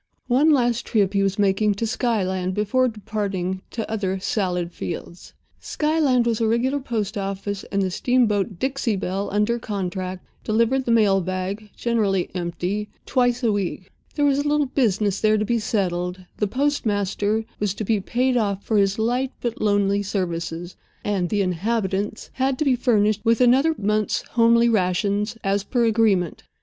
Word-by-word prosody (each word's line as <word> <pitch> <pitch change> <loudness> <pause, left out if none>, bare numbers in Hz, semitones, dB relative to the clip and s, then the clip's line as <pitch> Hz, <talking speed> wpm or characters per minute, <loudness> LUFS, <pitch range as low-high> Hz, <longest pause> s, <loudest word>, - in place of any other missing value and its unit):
One 265 +6 +3
last 245 -5 +2
trip 200 -3 +2
he 200 - +2
was 195 0 0
making 205 +1 +2
to 230 - -2
Skyland 190 -6 -1
before 255 +5 +2
departing 200 -4 -3
to 225 -2 -4
other 195 -3 -2
salad 180 -3 -1
fields. 170 0 -7 0.3
Skyland 300 -6 +1
was 230 -1 0
a 225 - +2
regular 250 +5 +1
post 220 -5 -3
office, 195 0 -4
and 200 -1 -1
the 185 - -1
steamboat, 215 -3 +1
Dixie 265 -1 -1
Belle, 195 +1 -2
under 210 +4 +1
contract, 185 -3 -4 0.2
delivered 230 +4 +1
the 235 - 0
mail 205 -4 +4
bag 185 +4 -4
(generally 205 -6 0
empty) 180 +4 -3 0.2
twice 245 -1 +1
a 230 - +3
week. 195 -2 -3 0.2
There 290 - +2
was 280 -1 +3
a 290 - -1
little 295 0 +2
business 210 -7 0
there 215 0 +4
to 210 - 0
be 235 +1 +1
settled—the 185 -2 -2
postmaster 215 -5 0
was 205 -2 -1
to 215 - -4
be 215 0 +1
paid 250 +6 0
off 200 -4 0
for 220 - 0
his 195 0 +2
light 245 +4 0
but 235 -2 -4
lonely 205 -1 +2
services, 175 -3 -3 0.3
and 195 -4 0
the 205 -2 +1
"inhabitants" 200 +2 -2
had 265 0 0
to 305 - 0
be 265 -2 +4
furnished 215 -4 +2
with 230 0 +3
another 265 +6 +4
month's 210 +1 0
homely 235 0 +4
rations, 205 +1 0
as 195 0 +1
per 240 +2 +1
agreement. 210 -6 +2
210 Hz, 160 wpm, -23 LUFS, 195-235 Hz, 0.3 s, mail